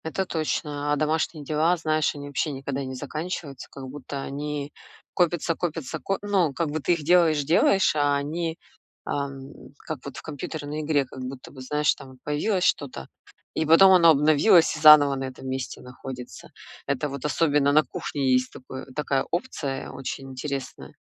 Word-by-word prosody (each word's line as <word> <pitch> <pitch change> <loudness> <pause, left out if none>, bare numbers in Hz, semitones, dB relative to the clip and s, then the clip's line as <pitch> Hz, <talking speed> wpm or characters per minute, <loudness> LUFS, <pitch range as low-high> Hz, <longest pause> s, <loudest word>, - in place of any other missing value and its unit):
Это 175 +4 -2
точно, 150 -3 -2
а - - +3
домашние 155 +1 -1
дела, 155 +4 +2
знаешь, 155 -1 0
они 145 0 -7
вообще 145 +2 -1
никогда 140 0 -4
не 130 0 -6
заканчиваются, 150 0 -5
как 135 -1 -9
будто 140 0 -6
они 145 +1 -5 0.4
копятся, 175 -1 +1
копятся, 160 -3 -4
ко 195 +8 -2
ну, 190 -8 +1
как 160 +3 -1
бы 155 - -2
ты 175 - +2
их 165 -3 -3
делаешь-делаешь, 165 +2 +4
а 145 -1 +2
они, 160 +3 -2 0.5
ам, 140 -1 -4 0.3
как 155 -2 -6
вот 140 -3 -8
в - - -7
компьютерной 150 0 -5
игре 150 -2 +1
как 130 - -11
будто 130 0 -8
бы, 130 - -11
знаешь, 150 +3 +1
там 135 - -13
вот 130 - -15
появилось 180 +6 0
что-то, 130 - -1 0.4
и 160 - -1
потом 165 +5 +7
оно 175 -3 +7
обновилось 155 +4 +5
и - - -6
заново 150 -2 +8
на 135 0 -3
этом 130 0 -8
месте 130 0 -4
находится. 125 -4 -9 0.4
Это 140 +1 -1
вот 140 -1 -7
особенно 150 -2 +2
на 155 +2 +5
кухне 140 -3 -2
есть 125 0 +1
такое 130 +1 -9
такая 140 -2 0
опция 155 - -3
очень 135 0 -6
интересная. 135 +1 -6
145 Hz, 170 wpm, -25 LUFS, 135-160 Hz, 0.5 s, заново